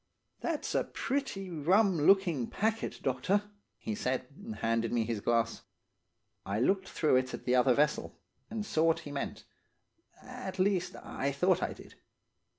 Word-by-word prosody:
"'That's 325 -3 -2
a - - +2
pretty 260 -9 -3
rum 185 +6 +3
looking, 165 - +3
packet, 220 +2 -1
doctor,' 160 +11 +1 0.3
he 220 - -4
said, 130 - -1
and 215 +4 -8
handed 115 0 0
me 115 -2 +1
his 110 -2 -2
glass. 115 0 +1 0.8
"I 100 +2 -2
looked 190 - +1
through 150 -5 +3
it 130 0 -1
at - - -11
the 125 - +2
other 125 0 +5
vessel, 150 0 0 0.3
and 215 -1 -3
saw 160 -5 +1
what 165 -1 +3
he 145 - -8
meant; 140 - -4 0.8
at 250 -7 -7
least, 185 -1 +1
I 140 +1 -2
thought 180 +6 +2
I - - -1
did. - - -14
165 Hz, 155 wpm, -31 LUFS, 130-200 Hz, 0.8 s, other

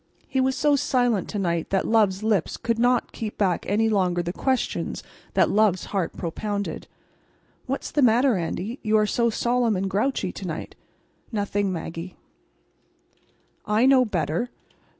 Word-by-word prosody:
He 265 - 0
was 260 0 +1
so 295 -1 +3
silent 245 -7 +1
to 210 - -4
night 170 -4 -1
that 195 - 0
love's 215 -3 +2
lips 210 -6 +1
could 230 -1 -1
not 245 0 +2
keep 215 -2 -6
back 185 -5 0
any 220 +3 +2
longer 180 -5 +1
the 175 +1 -3
questions 260 +4 -1 0.3
that - - +4
love's 205 -4 +2
heart 190 -4 -1
propounded. 200 +4 -4 0.8
"What's 270 +2 -3
the 295 - +1
matter, 245 +1 +4
Andy, 190 +7 -3
you 215 -1 +2
are 215 - +3
so 235 +2 +1
solemn 235 0 +1
and 190 +1 -1
grouchy 210 +8 0
to - - -7
night?" - - -5 0.6
"Nothing, 205 -2 -1
Maggie." 165 +1 -6 1.5
"I 215 +4 +3
know 265 -1 +6
better. 180 +1 -1
215 Hz, 150 wpm, -24 LUFS, 190-245 Hz, 1.5 s, know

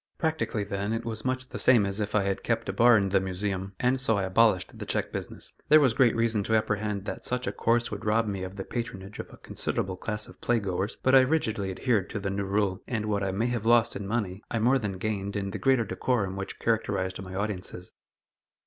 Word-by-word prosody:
Practically, 160 -9 -1
then, 100 +1 -2
it 115 - -3
was 110 -1 -3
much 130 0 -2
the - - -6
same 120 -6 +5
as 100 +1 -3
if 105 0 -2
I 105 - +3
had 95 0 -1
kept 115 -1 -1
a - - -2
bar 120 -1 +6
in 100 -1 +1
the 95 0 +3
Museum, 95 +1 -3
and 130 +1 +2
so 115 -5 +2
I 100 - 0
abolished 95 0 +2
the - - -5
check - - -1
business. - - -6 0.2
There 155 - +8
was 135 -6 +4
great 125 -2 +4
reason 115 -2 +1
to 110 - +2
apprehend 105 -2 -1
that - - -5
such 125 0 -2
a - - -1
course 120 +1 +1
would 105 -1 -5
rob 110 +2 +2
me 100 -3 -3
of 95 +1 -6
the 95 - -4
patronage 100 -3 -6
of - - -6
a - - -14
considerable 95 -1 -3
class 105 +2 -1
of - - -15
play 120 -1 +2
goers, 95 +1 -2
but 130 - +3
I 135 - +10
rigidly 115 -8 0
adhered 105 0 0
to 105 - -3
the 100 -1 -2
new 100 0 -2
rule, 100 -1 0
and 110 -3 -2
what 105 -1 0
I 95 - 0
may 105 +5 0
have 115 -2 -2
lost 120 -1 +4
in 100 - -5
money, 100 -3 -2
I - - -1
more 125 +5 +3
than 100 -5 -3
gained 100 0 -3
in 100 -1 -2
the - - -5
greater 130 -4 +3
decorum 100 -8 -1
which 95 0 -5
characterized 100 -5 -1
my 95 0 -8
audiences. 95 -3 -4
105 Hz, 240 wpm, -28 LUFS, 95-115 Hz, 0.2 s, I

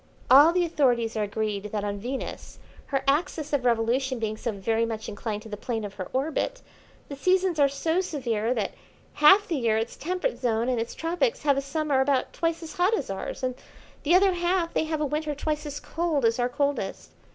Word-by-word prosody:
All 290 +5 +9
the 355 0 +2
authorities 245 -8 +1
are 215 - 0
agreed 210 -1 -2
that 210 0 -3
on 205 0 -3
Venus, 255 +5 -6 0.3
her 275 -1 -1
axis 300 +1 0
of 270 -3 +1
revolution 245 +3 +1
being 220 -2 -2
so 230 +2 -3
very 225 +3 0
much 225 -1 -3
inclined 210 0 -4
to - - -10
the 210 - -4
plane 225 0 -3
of 200 - -7
her 185 -2 -6
orbit, 315 - -2 0.4
the 280 - -6
seasons 365 +2 +2
are 280 -1 +5
so 320 +6 0
severe 240 - -2
that 210 -4 -1 0.4
half 380 +8 +6
the 330 - -1
year 230 -4 +2
its 225 +1 -2
temperate 350 -5 -2
zone 235 -1 0
and 250 -2 0
its 230 - -4
tropics 350 +9 -1
have 285 -2 +4
a 275 - 0
summer 285 -1 0
about 265 -1 +1
twice 330 0 -1
as 325 - -8
hot 375 +5 +3
as 255 - -4
ours 195 +6 -5
and 255 0 0 0.5
the 330 +4 +3
other 385 0 +5
half 350 -1 0
they - - +1
have 310 -1 -2
a - - +2
winter 300 +1 -2
twice 300 +1 -2
as 290 0 -5
cold 320 -6 -1
as 230 +2 +2
our 245 0 +1
coldest. 280 -7 -2
275 Hz, 210 wpm, -26 LUFS, 225-320 Hz, 0.5 s, All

